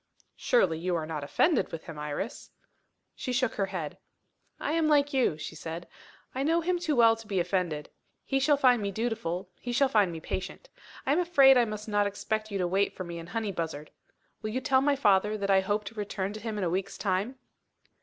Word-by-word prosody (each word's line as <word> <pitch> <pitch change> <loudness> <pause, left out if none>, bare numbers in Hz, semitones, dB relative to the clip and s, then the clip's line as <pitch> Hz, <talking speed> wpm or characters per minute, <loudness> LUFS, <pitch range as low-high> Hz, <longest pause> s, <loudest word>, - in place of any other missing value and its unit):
"Surely, 180 -9 +2
you 180 +1 -1
are 160 -2 -2
not 155 -2 -4
offended 265 - +2
with 165 - -6
him, 160 -2 -8
Iris?" 150 - -5 0.7
She 255 - -4
shook 250 -1 +1
her 195 -2 -1
head. 170 -6 -5 0.6
"I - - -2
am 320 -1 +2
like 290 -1 +3
you," 255 - +2
she 155 - -6
said. 165 +2 -7 0.5
"I 260 - -2
know 325 +4 +2
him 355 +1 0
too 320 -4 0
well 230 -2 +6
to 225 -1 -13
be 195 -3 0
offended. 175 -4 -1 0.4
He 270 - +1
shall 285 +1 +3
find 250 -4 +4
me 200 - -1
dutiful, 200 -4 -3
he 245 - -5
shall 270 +3 +3
find 210 -7 +3
me 165 - -6
patient. 185 - -5 0.4
I 265 - +1
am 305 - +3
afraid 280 -7 +6
I 245 -1 +5
must 215 -1 -6
not 205 -1 +2
expect 215 +2 -3
you 200 - -2
to 180 -2 0
wait 195 +3 +1
for 185 - -5
me 170 -1 -6
in 165 - -9
Honeybuzzard. 170 -9 -4 0.5
Will 215 - -3
you 240 +4 -1
tell 260 0 +3
my 285 +1 +3
father 210 -4 +3
that 200 -1 -1
I 190 - +6
hope 205 +2 -1
to 220 - -8
return 205 -2 -3
to 215 - -7
him 215 0 -4
in 205 - -1
a 175 - +1
week's 190 +2 -2
time?" 200 +6 -1
210 Hz, 220 wpm, -29 LUFS, 180-255 Hz, 0.7 s, well